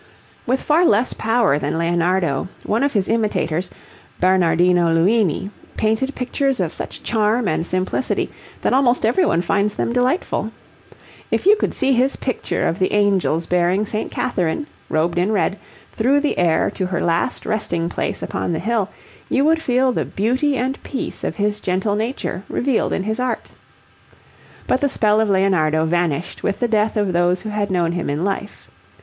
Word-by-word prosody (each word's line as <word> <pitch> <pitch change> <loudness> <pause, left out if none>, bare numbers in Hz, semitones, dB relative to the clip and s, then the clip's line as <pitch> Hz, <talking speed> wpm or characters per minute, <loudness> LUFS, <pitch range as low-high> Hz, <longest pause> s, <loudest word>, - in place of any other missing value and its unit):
With 260 +2 +1
far 310 +4 +3
less 235 -5 +3
power 225 - +2
than 145 +2 -2
Leonardo, 170 -3 +1 0.2
one 220 - 0
of 280 0 +1
his 200 -4 +1
imitators, 185 -6 0 0.5
Bernardino 175 -1 +3
Luini, 190 +2 +2 0.3
painted 220 +6 0
pictures 265 +1 -1
of 175 -4 -1
such - - -7
charm 220 0 +1
and 165 +1 -1
simplicity 185 +7 -1 0.3
that - - +2
almost 255 -3 +3
everyone 235 - +2
finds 200 +3 0
them 235 - -1
delightful. 250 - 0 0.8
If - - -1
you 410 +2 +7
could 415 - -1
see 270 - +2
his 260 +2 +2
picture 255 - -2
of 165 - -2
the 185 - +1
angels 195 -5 +2
bearing 180 +4 +1
St. 215 +1 -3
Catherine, 205 - -1 0.2
robed 170 +2 +1
in 185 +4 +1
red, 205 -1 0 0.3
through 265 +6 +2
the 295 - -1
air 165 -2 +2
to 185 - -3
her 180 -2 -2
last 170 +9 0
resting 175 -6 -1
place - - -3
upon 175 - -2
the - - -1
hill, 210 +1 -1 0.4
you 275 +2 +2
would 320 +1 +3
feel 255 -2 +2
the - - -1
beauty 260 +7 0
and 260 +3 -2
peace 270 - -5
of - - -2
his 210 -1 -1
gentle 190 +2 -1
nature 220 -3 -3
revealed 255 -2 0
in 190 - -1
his 220 +3 -2
art. 250 -1 -2 1.1
But 255 - +1
the 285 - +2
spell 215 -3 +2
of 220 - +1
Leonardo 175 -5 +2
vanished 170 -1 -1
with 200 - -1
the 240 - +1
death 215 -1 +1
of 205 -3 0
those 175 +1 +2
who 215 - -5
had 210 -1 -1
known 175 -3 +1
him 175 -3 -3
in 145 +4 -1
life. 200 +1 -4
205 Hz, 170 wpm, -20 LUFS, 175-245 Hz, 1.1 s, you